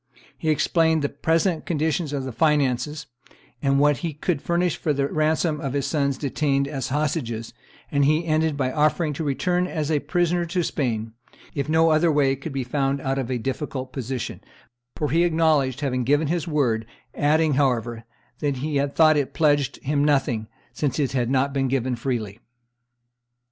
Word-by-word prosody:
He 160 - -3
explained 160 +1 +2
the 145 - +1
present 165 +3 0
condition 160 0 0
of 135 - -2
the 130 - -4
finances, 150 0 +1 0.6
and 140 -1 +2
what 145 -1 +4
he 165 +2 -4
could 150 0 -1
furnish 175 0 0
for 150 - -1
the 140 0 0
ransom 155 +1 0
of 135 -3 -3
his 140 -2 -1
sons 140 -2 0
detained 140 -1 0
as 135 -3 -3
hostages; 130 -6 -2 0.4
and 140 0 +2
he 155 +4 +2
ended 155 -2 +1
by 130 -2 0
offering 155 +2 +1
to 150 - -4
return 180 +5 0
as 155 -4 -2
a 150 - +2
prisoner 175 +2 0
to 175 +1 0
Spain 115 -8 -2 0.4
if 140 0 -3
no 160 +1 +4
other 155 +2 +3
way 140 -2 +2
could 140 +4 -7
be 135 -1 -2
found 135 +2 -1
out 135 0 -1
of 130 -2 -3
a 130 - 0
difficult 130 +1 -4
position, 130 -3 -4 0.5
for 150 - -2
he 165 +3 +3
acknowledged 155 -6 +2
having 130 -3 0
given 145 +4 +2
his 170 0 -1
word, 120 -8 0 0.3
adding, 155 +1 +2
however, 120 -4 0 0.4
that 145 -3 -1
he 145 +2 -2
had 140 0 -1
thought 155 -2 +5
it 140 -2 -2
pledged 145 -3 +2
him 145 +1 0
to 145 - +3
nothing, 130 -7 +1 0.3
since 145 -4 -1
it 140 -4 0
had 125 -3 0
not 135 +1 +1
been 135 -1 +1
given 130 -1 0
freely. 115 -4 -3
145 Hz, 180 wpm, -24 LUFS, 135-155 Hz, 0.6 s, thought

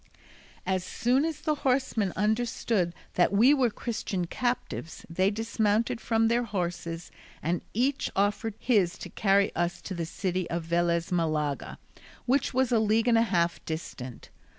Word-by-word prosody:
As 185 -1 0
soon 250 +8 +1
as 325 -2 -3
the 305 - +1
horsemen 250 -7 +1
understood 215 -4 0 0.2
that 175 - +3
we 230 +8 +6
were 260 -4 +3
Christian 210 -5 -3
captives, 240 -5 -3
they 185 +3 +2
dismounted 225 +2 0
from 225 -1 +2
their 235 +1 +2
horses, 175 -6 -4 0.3
and 170 +2 0
each 260 +4 +1
offered 205 +2 0
his 200 -8 +2
to - - -8
carry 200 -1 +2
us 175 +1 -1
to 195 - -5
the 170 -2 -3
city 185 +1 -2
of 170 -1 -2
Velez 170 0 +1
Malaga, 155 -4 -1 0.5
which 265 +3 +2
was 260 -1 +1
a 235 - +4
league 220 +2 +2
and 235 - +5
a 225 - +5
half 175 -6 +1
distant. 130 -6 -6
200 Hz, 150 wpm, -28 LUFS, 175-235 Hz, 0.5 s, we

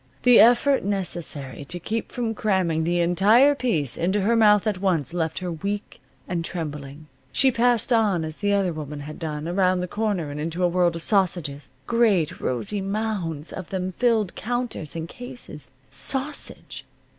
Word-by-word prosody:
The 245 -1 +7
effort 245 +4 +5
necessary 170 -9 -4
to 175 +5 -5
keep 220 +6 -3
from 235 -2 -2
cramming 185 -7 0
the 175 +1 +1
entire 210 +11 +5
piece 185 - -1
into 190 +4 +1
her 225 +5 +2
mouth 210 -2 +5
at 210 -4 -1
once 175 -6 0
left 165 -2 -1
her 180 -1 -3
weak 200 +6 -5 0.3
and 170 -2 -2
trembling. 150 -4 -5 0.3
She 265 0 +4
passed 240 0 +2
on 205 -8 +2
as 155 0 -7
the 205 -1 0
other 195 -3 +1
woman 150 -1 -6
had 150 +2 -8
done, 155 -2 -4
around 185 0 +2
the 180 - -3
corner, 200 -7 -2
and 145 - -6
into 165 +4 -2
a - - +5
world 175 -1 +2
of 165 - -5
sausages. 175 -8 0 0.2
Great 215 -9 +2
rosy 130 - -2
mounds 195 -7 -3
of 185 -3 -7
them 185 -1 -2
filled 220 -2 +1
counters 240 - -4
and 165 0 -4
cases. 245 - -7 0.2
Sausage! 265 - -2
185 Hz, 170 wpm, -24 LUFS, 160-220 Hz, 0.3 s, The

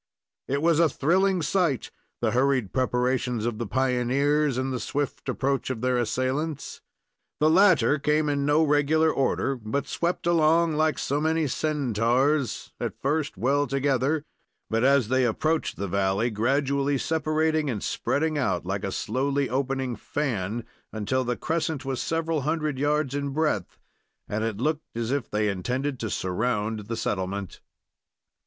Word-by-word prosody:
It 140 +3 -1
was 165 -1 +4
a 165 -2 +5
thrilling 185 +6 +2
sight, 165 - 0 0.3
the - - +1
hurried 130 -5 +1
preparations 125 -2 0
of 115 -2 -2
the 120 - -3
pioneers, 135 +3 +1
and 130 0 -1
the 125 - -2
swift 145 +2 -3
approach 135 0 -1
of 125 -4 -3
their 125 -1 +1
assailants. 130 +6 -2 0.6
The 155 +1 +4
latter 180 -4 +5
came 150 +2 +1
in 140 -1 0
no 145 +3 +3
regular 155 +2 +3
order, 135 0 0
but 125 +4 -3
swept 170 +4 -2
along 165 -1 +3
like 155 -1 +1
so 145 +2 -1
many 160 0 +1
Centaurs, 135 -1 0
at - - -4
first 145 +2 -1
well 140 +4 +1
together, 140 +2 +1 0.5
but, 115 +1 +1
as 135 -4 +4
they 130 0 +3
approached 155 +7 0
the 100 - -3
valley, 100 +5 +1
gradually 140 +5 +1
separating 155 0 0
and 110 -6 -3
spreading 155 +2 0
out, 130 - 0
like - - -3
a - - -2
slowly 140 +1 -1
opening 135 -1 -1
fan, 115 -4 -3 0.3
until 110 +5 -1
the 125 -1 -2
crescent 160 -3 -2
was 135 -2 -2
several 165 -2 -1
hundred 155 -1 -1
yards 145 -1 +1
in 140 0 -2
breadth, 140 - -1 0.5
and 105 +1 -2
it 110 -3 -2
looked 150 +1 -2
as 115 +1 -2
if 140 -4 -1
they 105 0 0
intended 125 +8 -2
to 110 - -3
surround 105 +2 -2
the 115 0 -3
settlement. 95 0 -3
135 Hz, 150 wpm, -26 LUFS, 120-150 Hz, 0.6 s, a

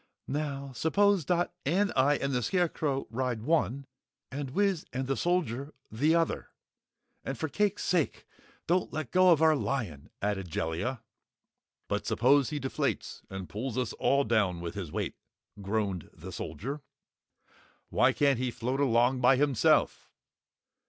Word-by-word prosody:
"Now, 140 -1 -3
suppose 190 - +2
Dot 175 +2 +1
and 195 +8 +1
I 140 +3 +4
and 140 0 -2
the 125 - +1
Scarecrow 155 - 0
ride 120 -2 -2
one, 140 -2 +1 0.5
and 140 0 -4
Wiz 195 +3 +1
and 130 +1 -2
the 135 +1 0
Soldier, 150 -6 -1 0.2
the 145 +9 +2
other. 165 -1 0 0.7
And 135 - -4
for 160 - -2
cake's 205 +5 0
sake 170 -5 0 0.4
don't 180 +2 +1
let 155 -6 -4
go 185 0 +5
our 160 -2 +5
lion!" 105 - -3
added 100 -3 -2
Jellia. 95 +11 -2 0.8
"But - - -2
suppose 135 +3 +4
he 150 - -3
deflates 135 -1 -2
and 95 -2 -6
pulls 115 +3 -4
us 125 -3 -1
all 140 +1 +2
down 105 -7 +1
with 85 -1 -5
his 95 -7 -5
weight," - - -3 0.4
groaned 100 -3 -2
the - - -10
Soldier. 140 +7 -5 1.1
"Why - - +4
can't 140 -4 +2
he 130 0 0
float 125 +3 -2
along 125 -1 +3
by 125 +2 +6
himself?" 140 -2 +2
135 Hz, 145 wpm, -30 LUFS, 115-155 Hz, 1.1 s, by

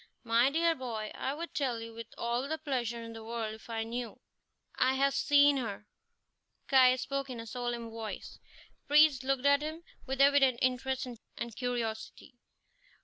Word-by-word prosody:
"My 235 +2 +4
dear 330 +3 +2
boy, 230 -7 -5
I 270 - -3
would 335 +2 -6
tell 255 -5 -1
you 230 0 -8
with 230 0 -8
all 240 +3 -1
the 315 +2 -2
pleasure 245 -6 -3
in 230 0 -8
the 225 0 -9
world 225 -1 -4
if 220 +2 -13
I 225 -1 -2
knew." 235 +1 -5 0.5
"I 260 +1 +2
have 275 +1 +2
seen 285 0 +5
her." 210 -5 -4 0.8
Caius 255 -1 +5
spoke 275 -1 -3
in 245 -2 -6
a 230 - -6
solemn 240 0 -4
voice. 225 -1 -7 0.3
The - - -39
priest 295 -3 +5
looked 270 0 0
at 285 0 +5
him 315 +2 -5 0.2
with 265 0 -3
evident 275 -3 +5
interest 260 +1 0
and 235 -1 -8
curiosity. 240 -1 -4
250 Hz, 170 wpm, -31 LUFS, 230-275 Hz, 0.8 s, seen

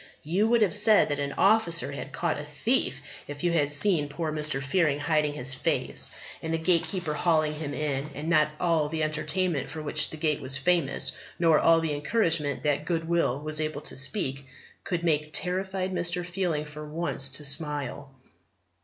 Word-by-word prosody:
You 185 +8 +1
would 235 -1 +3
have 200 - 0
said 210 -3 +5
that 145 0 -2
an 140 -1 -3
officer 195 -5 +2
had - - -7
caught - - -2
a - - -5
thief - - -1 0.2
if 145 +2 -8
you 175 - +2
had 150 -4 +1
seen 145 0 +4
poor 160 +1 -3
Mr. 150 -2 0
Fearing 145 +1 +1
hiding 150 0 +1
his 135 -2 0
face, 130 - +1 0.3
and 160 - -4
the 165 - +1
Gatekeeper 170 0 0
hauling 155 -1 +1
him 150 -2 -5
in. 140 0 -2
And 150 +2 -6
not 155 -2 +3
all 165 -4 +1
the 160 0 -2
entertainment 155 +1 -1
for 160 - -7
which 155 0 -1
the 155 - -8
Gate 155 -2 -1
was 135 0 0
famous, 155 +1 +1 0.3
nor 165 -3 +4
all 165 0 +5
the 160 -2 -2
encouragement 150 -3 0
that 145 0 0
Goodwill 165 -5 0
was 155 0 0
able 155 -1 -3
to - - -4
speak, 135 -1 -1 0.4
could 170 -2 -3
make 155 -2 0
terrified 190 +1 -1
Mr. 175 0 -1
Fearing 175 -4 -2
for 150 0 -9
once 150 -3 -1
to 150 - -9
smile. 145 -1 -1
155 Hz, 180 wpm, -27 LUFS, 145-170 Hz, 0.4 s, said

